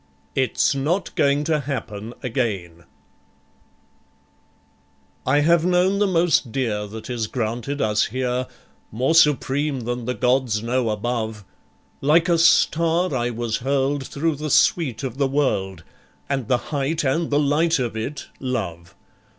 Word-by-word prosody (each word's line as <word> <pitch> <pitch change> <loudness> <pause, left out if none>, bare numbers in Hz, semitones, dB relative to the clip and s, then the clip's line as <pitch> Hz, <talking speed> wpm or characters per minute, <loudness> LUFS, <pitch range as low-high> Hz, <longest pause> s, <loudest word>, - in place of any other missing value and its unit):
It's 130 +1 +1
Not 155 +8 -1
Going 140 +1 +2
to 155 0 +1
Happen 115 -5 -5
Again 100 - -3 2.4
I 145 - +4
have 170 +2 +4
known 180 +2 +2
the 205 - +3
most 165 -8 +2
dear 110 -5 -2
that 110 +2 -9
is 120 -3 -2
granted 120 +4 -3
us 105 0 +2
here, 125 +1 -2 0.4
More 130 +8 +1
supreme 145 -3 +2
than 120 0 -4
the 125 +1 -2
gods 125 -4 +1
know 120 0 0
above, 110 -1 -3 0.6
Like 160 +5 +4
a 170 -2 +3
star 165 +1 +3
I 120 -1 0
was 115 -2 -2
hurled 135 +1 -1
through 155 +1 -1
the 155 +1 -4
sweet 135 -5 +2
of 130 0 -5
the 140 - +3
world, 100 - -1 0.4
And 135 -5 -2
the 125 - +3 0.2
height 145 +3 0
and 155 +5 0
the 145 - +2
light 155 +3 +2
of 120 -4 -2
it, 135 +6 -4
Love. 95 -10 -4
130 Hz, 140 wpm, -22 LUFS, 115-150 Hz, 2.4 s, I